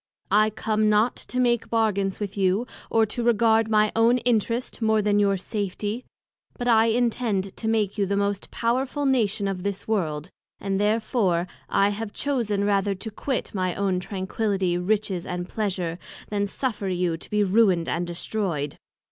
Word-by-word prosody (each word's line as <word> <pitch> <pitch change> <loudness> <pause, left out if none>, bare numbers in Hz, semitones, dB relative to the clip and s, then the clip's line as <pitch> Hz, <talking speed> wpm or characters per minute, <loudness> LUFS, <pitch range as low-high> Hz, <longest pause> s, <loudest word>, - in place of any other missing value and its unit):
I 215 +2 +5
come 215 0 0
not 215 +3 +3
to 250 - -4
make 240 -2 +2
bargains 205 -4 +1
with 205 -2 -4
you, 195 +3 +1 0.2
or 225 -1 +3
to 220 +3 -4
regard 225 -1 +3
my 215 -1 +3
own 230 +2 +4
Interest 235 0 0
more 220 -1 +3
than 205 0 +2
your 200 -1 +3
Safety; 205 +4 -3 0.5
but 245 - -3
I 225 -1 +5
intend 225 -4 0
to 220 - -3
make 215 -2 0
you 200 - +2
the 200 +1 0
most 200 -1 -1
powerful 260 +5 -1
Nation 220 -6 +1
of 190 -2 -3
this 200 0 -4
World, 165 -6 -1 0.3
and 195 -1 -1
therefore 210 -4 +1 0.2
I 200 +1 +3
have 205 +1 -4
chosen 230 -8 -1
rather 200 -1 +1
to 220 +4 -7
quit 260 +4 -3
my 185 -3 -1
own 195 -2 0
Tranquility, 190 -1 -1
Riches 190 0 0
and 180 0 -4
Pleasure, 185 -6 -2 0.3
than 205 -1 0
suffer 210 -2 -2
you 180 -2 0
to - - -12
be 210 0 +2
ruined 190 -4 +3
and 175 +1 -1
destroyed. 170 -5 -3
205 Hz, 165 wpm, -25 LUFS, 190-225 Hz, 0.5 s, I